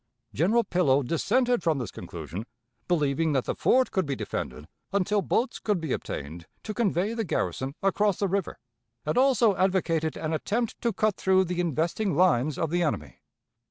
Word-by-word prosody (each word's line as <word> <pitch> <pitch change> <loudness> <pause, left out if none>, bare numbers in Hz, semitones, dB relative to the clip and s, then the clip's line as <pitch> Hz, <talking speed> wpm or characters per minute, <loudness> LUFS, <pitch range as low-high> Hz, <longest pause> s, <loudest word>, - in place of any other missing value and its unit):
General 215 - +3
Pillow 145 -9 +2
dissented 235 - +1
from 160 -3 +1
this 120 -7 -4
conclusion, 105 +8 -7 0.4
believing 155 -1 +1
that 135 -3 +1
the - - -1
fort 260 0 +2
could 190 -6 0
be 140 - -1
defended 70 - -5 0.2
until 200 +1 +1
boats 240 +6 0
could 210 -4 0
be 160 -5 -2
obtained 80 +4 -6 0.2
to 215 - -4
convey 205 -2 0
the 230 -1 -1
garrison 135 -6 -2
across 200 0 +2
the 200 - 0
river, 195 -1 -2 0.5
and 150 - -1
also 250 -5 +4
advocated 170 -4 +1
an 155 0 -3
attempt 220 +8 -2
to 235 - +1
cut 215 0 0
through 190 0 +3
the 180 -1 -3
investing 170 +3 0
lines 155 -5 +3
of 165 -2 -1
the 175 +1 +1
enemy. 75 - -2
175 Hz, 170 wpm, -27 LUFS, 150-205 Hz, 0.5 s, also